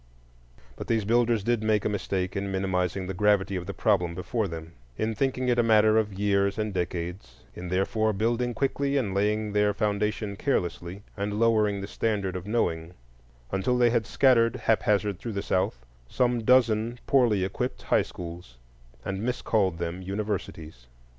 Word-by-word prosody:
But -, -, -7 dB
these 110 Hz, -3 st, +1 dB
builders 115 Hz, -1 st, +2 dB
did 120 Hz, 0 st, +1 dB
make 110 Hz, -2 st, +1 dB
a -, -, +3 dB
mistake 95 Hz, -2 st, -2 dB
in 100 Hz, 0 st, -2 dB
minimizing 95 Hz, -1 st, -1 dB
the 95 Hz, -, -4 dB
gravity 100 Hz, 0 st, +2 dB
of 90 Hz, -1 st, -4 dB
the -, -, -4 dB
problem 90 Hz, -6 st, +1 dB
before 105 Hz, +4 st, -2 dB
them; 80 Hz, -1 st, -8 dB, 0.3 s
in 110 Hz, +1 st, -1 dB
thinking 130 Hz, +2 st, -1 dB
it 120 Hz, -1 st, +2 dB
a -, -, +7 dB
matter 110 Hz, -1 st, +4 dB
of 105 Hz, -3 st, -3 dB
years 100 Hz, 0 st, +1 dB
and 110 Hz, -2 st, -2 dB
decades; 90 Hz, -6 st, -4 dB
in 90 Hz, -, -7 dB
therefore 95 Hz, +4 st, +1 dB
building 115 Hz, +4 st, -1 dB
quickly 140 Hz, +2 st, 0 dB
and 110 Hz, -8 st, -1 dB
laying 105 Hz, +1 st, 0 dB
their 105 Hz, -1 st, +2 dB
foundation 105 Hz, -1 st, -1 dB
carelessly, 90 Hz, -6 st, -2 dB
and 105 Hz, +1 st, -3 dB
lowering 105 Hz, -3 st, +2 dB
the 100 Hz, -, -5 dB
standard 100 Hz, -3 st, -2 dB
of 90 Hz, +1 st, -6 dB
knowing, 85 Hz, -6 st, -1 dB, 0.6 s
until 95 Hz, +6 st, 0 dB
they 120 Hz, -1 st, +4 dB
had 115 Hz, -4 st, 0 dB
scattered 115 Hz, 0 st, +3 dB
haphazard 105 Hz, -5 st, +1 dB
through 115 Hz, -, -5 dB
the 100 Hz, -, -3 dB
South -, -, -1 dB, 0.2 s
some 120 Hz, -, 0 dB
dozen 115 Hz, -1 st, +3 dB
poorly 120 Hz, -8 st, +3 dB
equipped 95 Hz, -, -4 dB
high -, -, +3 dB
schools 85 Hz, -7 st, -9 dB, 0.5 s
and 95 Hz, 0 st, -3 dB
miscalled 110 Hz, -6 st, 0 dB
them 85 Hz, +2 st, -4 dB
universities. 95 Hz, -, -5 dB
105 Hz, 165 wpm, -27 LUFS, 95-115 Hz, 0.6 s, a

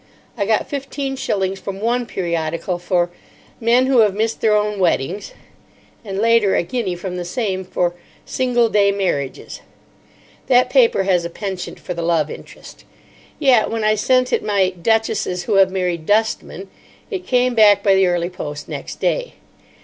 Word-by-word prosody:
I 200 Hz, -4 st, -2 dB
got 220 Hz, -1 st, +1 dB
fifteen 275 Hz, -1 st, -4 dB
shillings 195 Hz, -7 st, -2 dB
from 195 Hz, 0 st, -6 dB
one 240 Hz, +2 st, 0 dB
periodical 170 Hz, -1 st, -2 dB
for 175 Hz, 0 st, 0 dB, 0.5 s
"Men 240 Hz, +3 st, +3 dB
Who 260 Hz, -2 st, +3 dB
Have 210 Hz, -3 st, +4 dB
Missed 220 Hz, +2 st, -1 dB
Their 215 Hz, -1 st, +3 dB
Own 210 Hz, -1 st, -1 dB
Weddings," 180 Hz, +2 st, -1 dB, 0.7 s
and, 195 Hz, -3 st, -5 dB
later, 225 Hz, -2 st, +3 dB
a -, -, +2 dB
guinea 215 Hz, -3 st, -3 dB
from 180 Hz, +1 st, -6 dB
the 180 Hz, -, -3 dB
same 190 Hz, 0 st, -2 dB
for 180 Hz, -1 st, -1 dB, 0.3 s
"Single 245 Hz, -2 st, +1 dB
Day 200 Hz, -2 st, +3 dB
Marriages." 175 Hz, -9 st, -3 dB, 0.9 s
That 250 Hz, -1 st, +4 dB
paper 240 Hz, -7 st, +4 dB
has 185 Hz, -3 st, +2 dB
a 170 Hz, -, -4 dB
penchant 190 Hz, 0 st, -6 dB
for 180 Hz, -, -5 dB
the 170 Hz, -, -5 dB
love 165 Hz, -3 st, +1 dB
interest. -, -, -12 dB, 0.5 s
Yet 260 Hz, -7 st, +3 dB
when 225 Hz, -1 st, -2 dB
I 215 Hz, 0 st, +3 dB
sent 255 Hz, +4 st, +1 dB
it -, -, +1 dB
my 200 Hz, -3 st, +1 dB
"Duchesses 190 Hz, -1 st, -1 dB
Who 210 Hz, -1 st, +1 dB
Have 190 Hz, -1 st, +5 dB
Married 180 Hz, -4 st, -2 dB
Dustmen," 210 Hz, -2 st, 0 dB, 0.4 s
it 375 Hz, -3 st, -5 dB
came 250 Hz, 0 st, +2 dB
back 205 Hz, -3 st, +5 dB
by 195 Hz, -, +4 dB
the 190 Hz, -1 st, +4 dB
early 175 Hz, 0 st, -1 dB
post 150 Hz, -4 st, -7 dB
next -, -, -7 dB
day. -, -, -1 dB
200 Hz, 165 wpm, -19 LUFS, 180-230 Hz, 0.9 s, Have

